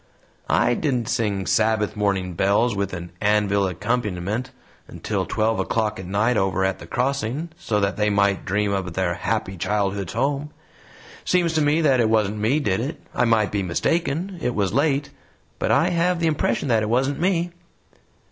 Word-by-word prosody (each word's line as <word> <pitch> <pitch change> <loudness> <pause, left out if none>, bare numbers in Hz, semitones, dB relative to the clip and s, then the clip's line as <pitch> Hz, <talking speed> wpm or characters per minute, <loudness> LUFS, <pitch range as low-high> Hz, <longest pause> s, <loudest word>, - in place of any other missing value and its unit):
I - - +3
didn't 125 -4 -1
sing 105 -5 -1
'Sabbath 110 0 +1
Morning 100 -3 0
Bells' 100 +6 +2
with 100 -1 -2
an 85 -1 -7
anvil 105 -1 +2
accompaniment 105 +3 -2 0.4
until - - -3
twelve 110 +1 0
o'clock 110 -2 -1
at 95 - -7
night 105 +5 +1
over 95 -1 +1
at 95 -1 -1
the 85 - -10
Crossing, 135 - -1
so 105 -10 -1
that 100 0 0
they 105 0 +2
might 100 -1 +2
dream 105 +1 0
of 95 -2 -2
their 95 -2 0
Happy 95 +2 -2
Childhood's 100 0 -1
Home. 140 +4 -1 0.7
It - - -8
seems 175 -2 +2
to 160 - +2
me 150 +2 +3
that 135 -5 +3
it 115 -2 +3
wasn't 105 -1 +1
me 115 +8 +2
did 100 -10 0
it. 135 +7 -4
I - - +2
might 110 -3 +2
be 100 - 0
mistaken 165 - -1
it 125 - -1
was 100 -2 0
late 140 +1 +1 0.5
but - - -1
I 170 - +3
have 175 0 +1
the 170 - 0
impression 150 -2 0
that 115 -2 +3
it 105 - -2
wasn't 135 +4 +1
me." 175 -1 +1
110 Hz, 180 wpm, -23 LUFS, 100-140 Hz, 0.7 s, I